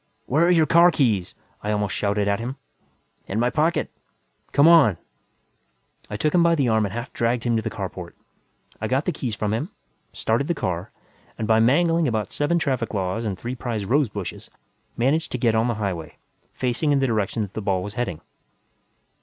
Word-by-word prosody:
"Where 155 Hz, +6 st, +2 dB
are -, -, +3 dB
your 165 Hz, -3 st, +5 dB
car 170 Hz, +3 st, +6 dB
keys?" 110 Hz, -, 0 dB, 0.3 s
I 105 Hz, -, -2 dB
almost 105 Hz, -2 st, -1 dB
shouted 100 Hz, 0 st, 0 dB
at 100 Hz, 0 st, +1 dB
him. 125 Hz, +3 st, -4 dB, 0.7 s
"In 100 Hz, -, -2 dB
my 120 Hz, +1 st, +2 dB
pocket." 160 Hz, +2 st, 0 dB, 0.6 s
"Come 145 Hz, +3 st, +5 dB
on!" 155 Hz, -, +6 dB, 1.1 s
I 105 Hz, -, -4 dB
took 150 Hz, +8 st, 0 dB
him 180 Hz, -, +5 dB
by 170 Hz, 0 st, +4 dB
the 140 Hz, -5 st, +1 dB
arm 110 Hz, -2 st, +2 dB
and -, -, -8 dB
half 120 Hz, +1 st, -6 dB
dragged 120 Hz, 0 st, 0 dB
him 120 Hz, -1 st, +1 dB
to 110 Hz, -, +1 dB
the -, -, -3 dB
carport. -, -, -6 dB, 0.7 s
I -, -, -1 dB
got 135 Hz, +4 st, 0 dB
the -, -, +1 dB
keys 125 Hz, -8 st, -4 dB
from 105 Hz, 0 st, -1 dB
him, 135 Hz, -, -2 dB, 0.4 s
started 115 Hz, +6 st, -1 dB
the 170 Hz, -, 0 dB
car, 90 Hz, -, -3 dB, 0.5 s
and 110 Hz, -, -3 dB
by 110 Hz, 0 st, +4 dB
mangling 165 Hz, +7 st, +3 dB
about 110 Hz, -2 st, -2 dB
seven 145 Hz, +4 st, +1 dB
traffic 130 Hz, -9 st, -1 dB
laws 95 Hz, +4 st, -2 dB
and 100 Hz, -4 st, -2 dB
three 120 Hz, +6 st, -5 dB
prize 115 Hz, -5 st, -4 dB
rosebushes, 110 Hz, -, -1 dB, 0.5 s
managed 145 Hz, +7 st, +1 dB
to -, -, 0 dB
get 115 Hz, -2 st, +2 dB
on 110 Hz, +2 st, +2 dB
the 120 Hz, -, 0 dB
highway, 95 Hz, -7 st, -4 dB, 0.3 s
facing 130 Hz, +4 st, -1 dB
in 145 Hz, -, +3 dB
the 135 Hz, -, +2 dB
direction 110 Hz, -2 st, 0 dB
that 100 Hz, -, -8 dB
the 110 Hz, -, -4 dB
ball 95 Hz, -3 st, 0 dB
was 105 Hz, -, -6 dB
heading. 105 Hz, -9 st, -3 dB
115 Hz, 195 wpm, -23 LUFS, 105-145 Hz, 1.1 s, car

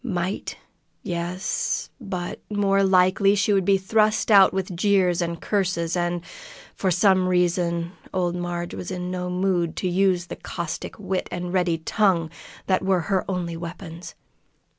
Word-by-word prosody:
Might? 185 Hz, -5 st, -3 dB, 0.5 s
Yes; 175 Hz, +1 st, -2 dB
but 185 Hz, -5 st, -5 dB
more 200 Hz, -1 st, +2 dB
likely 190 Hz, +1 st, +4 dB
she 205 Hz, +1 st, +2 dB
would 195 Hz, -2 st, +2 dB
be 195 Hz, 0 st, +4 dB
thrust 215 Hz, +3 st, +1 dB
out 195 Hz, -2 st, +8 dB
with 190 Hz, -1 st, -3 dB
jeers 185 Hz, -2 st, +2 dB
and 170 Hz, -1 st, -2 dB
curses, 180 Hz, -5 st, -1 dB
and, 175 Hz, -1 st, -1 dB, 0.5 s
for 190 Hz, -, -1 dB
some 185 Hz, +1 st, +3 dB
reason, 175 Hz, -1 st, +1 dB, 0.2 s
old 180 Hz, -2 st, 0 dB
Marg 175 Hz, -1 st, -4 dB
was 180 Hz, -, -6 dB
in 180 Hz, -1 st, -4 dB
no 180 Hz, 0 st, -3 dB
mood 180 Hz, -2 st, 0 dB
to 185 Hz, -, -2 dB
use 180 Hz, -1 st, +2 dB
the -, -, -7 dB
caustic 170 Hz, -2 st, -5 dB
wit 190 Hz, -3 st, -2 dB
and 175 Hz, 0 st, -4 dB
ready 180 Hz, -3 st, +2 dB
tongue 170 Hz, -1 st, +1 dB, 0.3 s
that 190 Hz, -1 st, +1 dB
were 190 Hz, -2 st, +2 dB
her 190 Hz, -, +2 dB
only 175 Hz, -3 st, -2 dB
weapons. 170 Hz, 0 st, -8 dB
180 Hz, 150 wpm, -24 LUFS, 175-195 Hz, 0.5 s, out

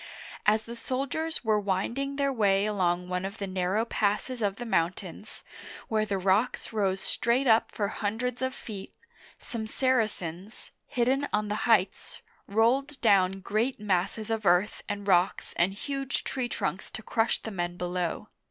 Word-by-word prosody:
As 215 Hz, +1 st, +4 dB
the 235 Hz, -, -7 dB
soldiers 275 Hz, +5 st, -2 dB
were 215 Hz, -1 st, +3 dB
winding 235 Hz, +8 st, -1 dB
their 275 Hz, -1 st, +1 dB
way 200 Hz, -4 st, +3 dB
along 180 Hz, -4 st, +1 dB
one 180 Hz, 0 st, -2 dB
of 195 Hz, +3 st, -5 dB
the 200 Hz, -, -3 dB
narrow 190 Hz, +3 st, 0 dB
passes 220 Hz, +3 st, -1 dB
of 200 Hz, -2 st, +1 dB
the 240 Hz, -, -6 dB
mountains, 185 Hz, 0 st, -2 dB, 0.5 s
where 215 Hz, -1 st, +1 dB
the 200 Hz, -, 0 dB
rocks 195 Hz, +6 st, +1 dB
rose 195 Hz, -3 st, +1 dB
straight 235 Hz, +7 st, +1 dB
up 225 Hz, -2 st, +4 dB
for 205 Hz, -3 st, -1 dB
hundreds 230 Hz, +4 st, -2 dB
of 260 Hz, 0 st, -1 dB
feet, 200 Hz, -5 st, -8 dB, 0.4 s
some 220 Hz, -2 st, -5 dB
Saracens, 215 Hz, -7 st, -1 dB, 0.2 s
hidden 260 Hz, +4 st, +1 dB
on 210 Hz, 0 st, 0 dB
the 210 Hz, +3 st, -2 dB
heights, 195 Hz, -4 st, +1 dB, 0.2 s
rolled 255 Hz, +7 st, +2 dB
down 195 Hz, -3 st, +4 dB
great 220 Hz, +7 st, 0 dB
masses 205 Hz, +2 st, -1 dB
of 220 Hz, -1 st, -1 dB
earth 185 Hz, +2 st, +3 dB
and 205 Hz, 0 st, -4 dB
rocks 180 Hz, 0 st, +2 dB
and 185 Hz, +3 st, +2 dB
huge 275 Hz, +4 st, -3 dB
tree 255 Hz, -2 st, -2 dB
trunks 195 Hz, -4 st, -2 dB
to 215 Hz, -, -8 dB
crush 225 Hz, +1 st, +1 dB
the 220 Hz, -, -6 dB
men 175 Hz, -2 st, -3 dB
below. 180 Hz, -1 st, -2 dB
210 Hz, 160 wpm, -28 LUFS, 190-235 Hz, 0.5 s, As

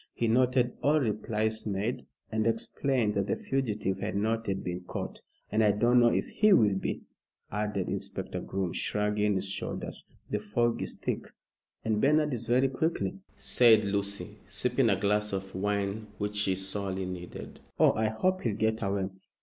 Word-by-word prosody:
He 115 Hz, -, 0 dB
noted 125 Hz, +1 st, +3 dB
all 150 Hz, +2 st, +4 dB
replies 110 Hz, -2 st, -1 dB
made, 105 Hz, +4 st, -2 dB, 0.2 s
and 110 Hz, 0 st, +1 dB
explained 115 Hz, 0 st, +1 dB
that 100 Hz, -1 st, 0 dB
the -, -, +1 dB
fugitive 110 Hz, -8 st, -1 dB
had -, -, -3 dB
not 110 Hz, +2 st, 0 dB
yet 95 Hz, -1 st, -1 dB
been 90 Hz, 0 st, -3 dB
caught. 90 Hz, -, -6 dB, 0.3 s
"And 110 Hz, +1 st, +3 dB
I 105 Hz, -, +5 dB
don't 120 Hz, +4 st, +4 dB
know 120 Hz, -, +6 dB
if -, -, +1 dB
he 210 Hz, -1 st, +4 dB
will 105 Hz, -, +5 dB
be," 95 Hz, -, -3 dB, 0.5 s
added 105 Hz, -2 st, -1 dB
Inspector -, -, -3 dB
Groom, 95 Hz, -3 st, -2 dB
shrugging 105 Hz, 0 st, +1 dB
his 95 Hz, +1 st, +1 dB
shoulders; 95 Hz, -, -4 dB, 0.2 s
"the 105 Hz, -, -1 dB
fog 115 Hz, +3 st, 0 dB
is -, -, -2 dB
thick." -, -, -3 dB, 0.6 s
"And 110 Hz, -1 st, +1 dB
Bernard 150 Hz, +1 st, +3 dB
is 120 Hz, -1 st, -4 dB
very 130 Hz, +3 st, +3 dB
quick," 160 Hz, +5 st, 0 dB, 0.4 s
said 110 Hz, -4 st, +5 dB
Lucy, 100 Hz, 0 st, -2 dB
sipping 125 Hz, -1 st, +1 dB
a 95 Hz, -3 st, +2 dB
glass 105 Hz, +1 st, +1 dB
of 95 Hz, 0 st, -4 dB
wine 100 Hz, +2 st, -1 dB
which 105 Hz, 0 st, -3 dB
she 100 Hz, -2 st, +1 dB
sorely 95 Hz, 0 st, -3 dB
needed. 90 Hz, -1 st, -7 dB, 0.2 s
"Oh, -, -, +7 dB
I 110 Hz, 0 st, +1 dB
hope 185 Hz, +13 st, 0 dB
he'll 110 Hz, -4 st, -1 dB
get 110 Hz, +1 st, +1 dB
away!" 100 Hz, -2 st, -1 dB
105 Hz, 170 wpm, -29 LUFS, 100-120 Hz, 0.6 s, Oh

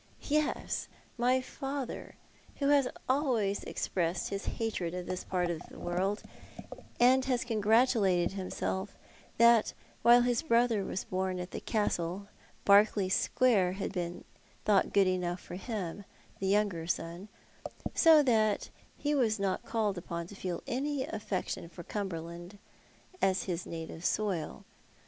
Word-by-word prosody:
Yes, 305 Hz, +1 st, 0 dB, 0.3 s
my 250 Hz, +2 st, +2 dB
father, 270 Hz, 0 st, -5 dB, 0.4 s
who 280 Hz, -1 st, 0 dB
has 285 Hz, -3 st, +5 dB, 0.2 s
always 250 Hz, -8 st, +1 dB
expressed 175 Hz, -1 st, -1 dB
his 200 Hz, 0 st, -4 dB
hatred 185 Hz, -7 st, -2 dB
oi 180 Hz, -, -3 dB
this 185 Hz, +1 st, -4 dB
part 180 Hz, -2 st, -1 dB
of 160 Hz, -3 st, -4 dB
the -, -, -12 dB
world, 190 Hz, +4 st, -1 dB, 0.8 s
and 255 Hz, +2 st, +5 dB
has 250 Hz, -3 st, +1 dB
congratulated 215 Hz, -5 st, +3 dB
himself 190 Hz, 0 st, -3 dB, 0.4 s
that 235 Hz, -1 st, +5 dB, 0.3 s
while 240 Hz, +1 st, +7 dB
liis 245 Hz, +5 st, 0 dB
brother 230 Hz, -4 st, +3 dB
was 190 Hz, -, -3 dB
born 185 Hz, 0 st, -2 dB
at 180 Hz, 0 st, -6 dB
the -, -, -4 dB
Castle, 200 Hz, -2 st, -1 dB, 0.4 s
Berkeley 200 Hz, -1 st, +5 dB
Square 195 Hz, -3 st, +3 dB
had 195 Hz, 0 st, -4 dB
been 175 Hz, -2 st, -4 dB, 0.4 s
thought 205 Hz, -2 st, +3 dB
good 200 Hz, -1 st, +5 dB
enough 180 Hz, -1 st, -1 dB
for -, -, -11 dB
him, 200 Hz, -2 st, -4 dB, 0.4 s
the 195 Hz, -, -1 dB
younger 195 Hz, -5 st, +1 dB
son; 170 Hz, +3 st, -3 dB, 0.7 s
so 320 Hz, -3 st, +7 dB
that 220 Hz, -5 st, +2 dB, 0.3 s
he 295 Hz, 0 st, 0 dB
was 235 Hz, -7 st, +2 dB
not 195 Hz, -1 st, -1 dB
called 210 Hz, -5 st, 0 dB
upon 170 Hz, -1 st, -5 dB
to 200 Hz, -, -11 dB
feel 185 Hz, -2 st, -4 dB
any 275 Hz, +2 st, -1 dB
affection 195 Hz, -5 st, -4 dB
for 175 Hz, 0 st, -10 dB
Cumberland 175 Hz, -1 st, -5 dB, 0.6 s
as 190 Hz, 0 st, +2 dB
his 180 Hz, -2 st, -3 dB
native 165 Hz, 0 st, -7 dB
soil. 185 Hz, -7 st, -1 dB
200 Hz, 135 wpm, -31 LUFS, 180-235 Hz, 0.8 s, while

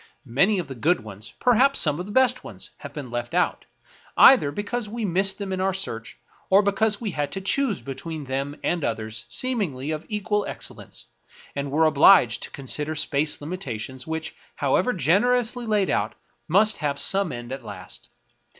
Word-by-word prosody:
Many 145 Hz, -, +2 dB
of 175 Hz, -5 st, -3 dB
the 135 Hz, -, -6 dB
good 155 Hz, +7 st, +1 dB
ones 105 Hz, 0 st, -10 dB
— -, -, -38 dB
perhaps 255 Hz, +3 st, +4 dB
some 150 Hz, 0 st, +2 dB
of 180 Hz, -, -5 dB
the -, -, -7 dB
best 255 Hz, +1 st, +3 dB
ones -, -, -9 dB
— -, -, -39 dB
have -, -, -8 dB
been 140 Hz, -5 st, -8 dB
left 120 Hz, +6 st, -4 dB
out, 180 Hz, -, 0 dB, 0.5 s
either 250 Hz, -, +7 dB
because 210 Hz, +6 st, -4 dB
we 230 Hz, 0 st, -3 dB
missed 190 Hz, +1 st, +2 dB
them 195 Hz, -2 st, -4 dB
in 185 Hz, -, -2 dB
our 190 Hz, 0 st, 0 dB
search, 115 Hz, -, -6 dB, 0.3 s
or 195 Hz, +2 st, +5 dB
because 205 Hz, +1 st, +1 dB
we 220 Hz, -4 st, -3 dB
had 145 Hz, -3 st, -2 dB
to 195 Hz, -, -3 dB
choose 215 Hz, +2 st, 0 dB
between 150 Hz, +3 st, -6 dB
them 135 Hz, +2 st, -4 dB
and 175 Hz, -3 st, 0 dB
others 110 Hz, 0 st, -4 dB
seemingly 155 Hz, -, -1 dB
of 155 Hz, 0 st, -4 dB
equal 210 Hz, -1 st, -1 dB
excellence, -, -, -8 dB, 0.5 s
and 140 Hz, 0 st, -3 dB
were 155 Hz, +4 st, +3 dB
obliged 145 Hz, -, +5 dB
to -, -, -5 dB
consider 150 Hz, +3 st, -3 dB
space 150 Hz, -1 st, 0 dB
limitations 130 Hz, -, -6 dB
which, 160 Hz, 0 st, -4 dB, 0.2 s
how 140 Hz, -2 st, +1 dB
ever 250 Hz, -, +2 dB
generously 235 Hz, -, +1 dB
laid 210 Hz, -3 st, +1 dB
out, 110 Hz, +2 st, -1 dB, 0.3 s
must 210 Hz, +5 st, +4 dB
have 145 Hz, -3 st, -2 dB
some 195 Hz, -2 st, +2 dB
end 120 Hz, 0 st, -7 dB
at 135 Hz, -1 st, -6 dB
last. 105 Hz, -2 st, -10 dB
165 Hz, 185 wpm, -24 LUFS, 135-205 Hz, 0.5 s, either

